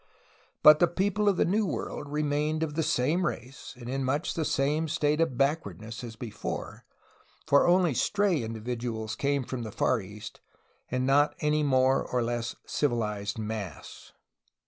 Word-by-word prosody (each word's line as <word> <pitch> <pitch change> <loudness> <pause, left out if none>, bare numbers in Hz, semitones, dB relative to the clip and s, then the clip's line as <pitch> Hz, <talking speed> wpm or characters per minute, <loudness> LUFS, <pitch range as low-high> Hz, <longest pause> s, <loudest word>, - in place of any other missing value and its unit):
But 150 0 +9
the 175 - +5
people 205 +4 +1
of 195 - +1
the - - +3
New 210 +5 +2
World 145 -4 -4
re 150 +1 -1
mained 150 +2 0
of 155 -2 -3
the 160 - 0
same 155 +5 +1
race, 130 -5 -5
and 120 -2 -9
in 135 +2 -2
much 145 +7 -1
the 165 - -1
same 150 +3 0
state 150 0 +1
of 130 -7 0
back 140 +4 +2
wardness 110 +2 -8
as 115 -2 -7
before, 110 -1 -6 0.6
for 140 - +4
only 175 -3 +4
stray 200 +1 +1
individuals 115 -1 -4
came 140 +1 0
from 125 0 -5
the 110 -2 -6
Far 110 - +1
East, 100 +2 -10 0.5
and 130 0 -1
not 145 +2 +3
any 150 0 +1
more 130 -2 +3
or 125 -1 -1
less 120 0 -2
civilized 110 -7 -1
mass. 105 -7 -6
135 Hz, 170 wpm, -28 LUFS, 120-155 Hz, 0.6 s, But